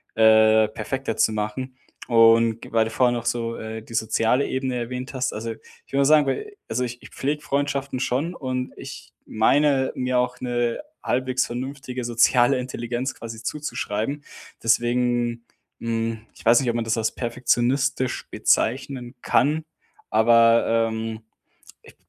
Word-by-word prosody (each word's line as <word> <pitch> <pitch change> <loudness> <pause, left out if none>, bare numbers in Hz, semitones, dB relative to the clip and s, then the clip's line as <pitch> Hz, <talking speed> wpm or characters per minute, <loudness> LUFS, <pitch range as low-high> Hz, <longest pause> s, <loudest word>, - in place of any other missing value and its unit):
äh, 110 0 +6
perfekter 115 +2 -4
zu - - +3
machen. 110 +5 -4 0.3
Und 115 -1 +5
g - - -11
weil 115 -1 +3
du 110 - -5
vorher 120 +2 +2
noch 120 -1 -4
so, 115 -1 -1
äh, 110 0 -6
die 115 - -13
soziale 115 +4 +1
Ebene 130 -1 -2
erwähnt 125 +3 -4
hast, 130 -1 -1
also, 115 +2 -4
ich 115 - -16
will 135 - +2
mal - - +5
sagen 150 0 +5
bei 410 - -3
also, 125 +3 -1
ich 125 0 -5
ich - - -12
pflege 150 +2 -2
Freundschaften 140 -1 -1
schon 135 +7 -1
und 130 -3 -4
ich - - -10
meine 135 +4 +2
mir 125 0 0
auch 125 0 -1
'ne 120 -1 -1 0.2
halbwegs 130 0 0
vernünftige 130 +1 -5
soziale 120 +2 +3
Intelligenz 125 +1 -3
quasi 115 0 -9
zuzuschreiben, 140 -1 -3 0.4
deswegen, 120 0 +1 0.3
hm, 115 -1 -2
ich - - -15
weiß 115 +1 +6
nicht, 130 - -1
ob 115 - -1
man 120 - 0
das 115 +1 0
als 110 -1 0
perfektionistisch 125 +2 0
bezeichnen 125 +1 0
kann, 150 +4 +2 0.5
aber, 115 +1 +5 0.2
ähm 110 0 -4 0.6
ich - - -17
120 Hz, 150 wpm, -23 LUFS, 115-130 Hz, 0.6 s, äh